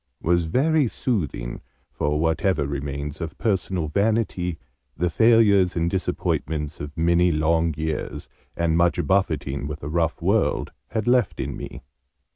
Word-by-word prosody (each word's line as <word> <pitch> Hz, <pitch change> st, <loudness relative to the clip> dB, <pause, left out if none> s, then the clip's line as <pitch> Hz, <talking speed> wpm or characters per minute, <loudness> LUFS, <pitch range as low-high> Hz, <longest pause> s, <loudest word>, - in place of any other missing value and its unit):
was 85 Hz, 0 st, +2 dB
very 145 Hz, -, +2 dB
soothing 75 Hz, -, -2 dB, 0.3 s
for 75 Hz, +1 st, -1 dB
whatever 80 Hz, 0 st, +1 dB
remains 70 Hz, +2 st, -4 dB
of 80 Hz, -2 st, -5 dB
personal 95 Hz, -6 st, 0 dB
vanity 100 Hz, -2 st, 0 dB, 0.4 s
the 90 Hz, +1 st, 0 dB
failures 105 Hz, -3 st, +4 dB
and 85 Hz, 0 st, 0 dB
disappointments 80 Hz, -5 st, -2 dB
of 75 Hz, +2 st, -7 dB
many 85 Hz, +2 st, +3 dB
long 80 Hz, +1 st, +2 dB
years, 80 Hz, 0 st, -3 dB, 0.3 s
and 85 Hz, -1 st, +1 dB
much 85 Hz, +1 st, +2 dB
buffeting 75 Hz, -8 st, 0 dB
with 75 Hz, -1 st, -6 dB
a 70 Hz, -, -4 dB
rough 80 Hz, 0 st, 0 dB
world, -, -, +1 dB, 0.2 s
had 110 Hz, -1 st, -2 dB
left 120 Hz, -4 st, +2 dB
in -, -, -3 dB
me. -, -, -8 dB
85 Hz, 135 wpm, -24 LUFS, 75-95 Hz, 0.4 s, failures